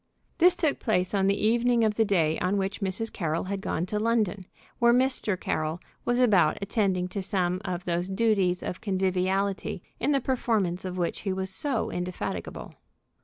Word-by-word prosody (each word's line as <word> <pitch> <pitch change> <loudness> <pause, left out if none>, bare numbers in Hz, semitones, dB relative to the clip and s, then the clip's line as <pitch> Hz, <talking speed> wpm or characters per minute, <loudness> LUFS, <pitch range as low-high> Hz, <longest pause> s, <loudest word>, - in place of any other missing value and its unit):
This 355 +1 +6
took 310 -4 0
place 185 -5 0
on 195 -1 +2
the 200 +1 +2
evening 235 +2 +3
of 215 -1 +2
the 225 - +2
day 165 -6 +1
on 185 +3 +1
which 195 +2 -2
Mrs. 195 +4 -3
Carroll 165 -2 -1
had 195 +1 -4
gone 170 -3 -1
to 210 +3 -2
London, 210 -4 0 0.3
where 235 0 +5
Mr. 255 -7 +1
Carroll 155 0 -2 0.3
was 240 0 +1
about 205 -11 +4
attending 195 -3 0
to 200 - -4
some 185 -1 -1
of 180 -3 -4
those 175 +1 -1
duties 195 -3 +1
of 180 - -5
conviviality 190 -1 -1 0.2
in - - 0
the 280 -2 +3
performance 220 -9 0
of 185 0 -4
which 175 -2 -1
he 195 - -2
was 190 0 -2
so 255 +3 -1
indefatigable. 180 0 -5
195 Hz, 175 wpm, -27 LUFS, 180-225 Hz, 0.3 s, This